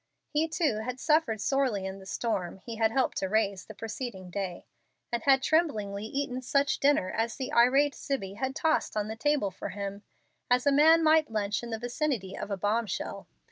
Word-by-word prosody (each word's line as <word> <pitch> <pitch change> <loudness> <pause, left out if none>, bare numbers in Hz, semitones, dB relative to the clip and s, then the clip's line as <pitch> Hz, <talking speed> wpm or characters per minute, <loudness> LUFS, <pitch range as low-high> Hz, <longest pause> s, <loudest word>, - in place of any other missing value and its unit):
He, 305 +2 +2
too, 310 -7 0
had 250 +3 -4
suffered 300 -8 +2
sorely 250 -5 0
in 190 0 -5
the 190 - -13
storm 195 -5 -2
he 225 +4 -8
had 220 0 +3
helped 260 +3 0
to 190 - -2
raise 200 -3 0
the 215 - -10
preceding 215 -4 -6
day, 185 -2 -4 0.5
and 235 -1 -1
had 270 0 +4
tremblingly 215 -12 +1
eaten 260 +1 -3
such 280 +3 +1
dinner 275 -10 +3
as 225 +1 -1
the 260 - -5
irate 270 +4 +5
Zibbie 195 -9 -3
had 265 +3 -2
tossed 315 -7 0
on 210 0 -1
the 220 - -4
table 280 -5 +1
for - - -6
him, 200 0 -5 0.5
as 250 +1 +3
a 285 - +5
man 320 +4 +6
might 315 -2 +4
lunch 210 -2 -1
in 240 - -7
the 225 - -2
vicinity 240 - -2
of 205 - -5
a 200 - -2
bombshell. 210 +2 -2
235 Hz, 195 wpm, -29 LUFS, 200-280 Hz, 0.5 s, man